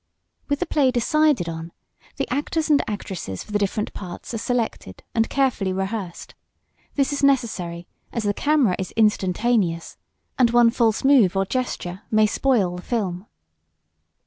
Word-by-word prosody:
With 285 0 0
the - - 0
play 290 -5 +2
decided 255 - +2
on, 165 0 -6 0.4
the - - -2
actors 305 +3 -1
and 290 - +5
actresses 190 - -5
for - - -14
the 205 - +1
different 205 +1 -1
parts 180 +4 -8
are 225 - -2
selected 230 - -3
and 225 -1 +1
carefully 255 -8 +1
rehearsed. 190 -1 -4 0.6
This 280 0 +1
is 285 - -2
necessary 195 -11 +1 0.3
as 230 - -3
the 205 0 +1
camera 285 -7 +2
is 190 - -3
instantaneous 205 -4 +1 0.4
and 245 -2 +5
one 240 0 +5
false 230 -3 +1
move 245 -9 +5
or 195 - +2
gestures 190 -6 -3
may 215 0 +4
spoil 210 -6 +1
the - - -7
film. 195 -3 -3
220 Hz, 150 wpm, -23 LUFS, 185-255 Hz, 0.6 s, and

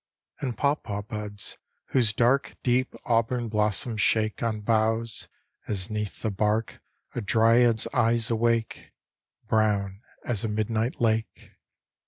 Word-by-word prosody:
And 125 -6 -3
paw 140 +3 +3
paw 105 -8 -5
buds, 105 -1 -7 0.3
whose 120 -5 +3
dark 120 +5 +1
Deep 125 +1 +1
auburn 115 0 +1
blossoms 105 +1 0
shake 110 0 +2
On 110 -2 -1
boughs, 110 +1 0 0.4
as 100 0 0
'neath 105 -1 -4
the 110 - 0
bark 105 +3 -1 0.3
A 120 - -3
dryad's 115 +1 +4
eyes 115 -2 +2
awake, 115 0 0 0.5
Brown 105 -3 +1 0.2
as 110 -5 -2
a - - 0
midnight 110 +2 -1
lake. 110 -1 -1
110 Hz, 125 wpm, -26 LUFS, 105-115 Hz, 0.5 s, dryad's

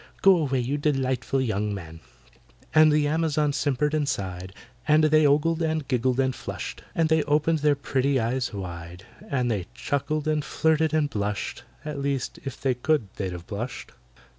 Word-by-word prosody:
Go 195 -1 +8
away, 135 -5 0
you 135 +5 -2
delightful 135 -3 0
young 105 -4 -1
man!" 80 -4 -9 0.7
And 155 0 +7
the 150 -1 +3
Amazons 150 -2 +1
simpered 150 +1 0
and 150 -2 +1
sighed, 95 -6 -4 0.4
And 155 +1 +5
they 155 -1 +5
ogled, 160 +4 +2
and 160 -3 -1
giggled, 125 0 +1
and 130 -1 +2
flushed, - - -6
And 165 -1 +3
they 160 0 +3
opened 155 +2 +2
their 150 0 +3
pretty 140 -1 0
eyes 120 +3 -1
wide, 90 -2 -7 0.2
And 125 -3 0
they 100 -5 -2
chuckled, 150 +2 -2
and 155 -1 +1
flirted, 160 +1 +1
and 155 -2 +2
blushed 105 -5 -3 0.2
(At 150 -2 -4
least, 140 -2 -2
if 135 - -6
they 135 -2 +1
could, 125 -3 0
they'd 95 -2 -2
have 90 -1 -8
blushed). 115 +5 -6
140 Hz, 170 wpm, -25 LUFS, 115-155 Hz, 0.7 s, Go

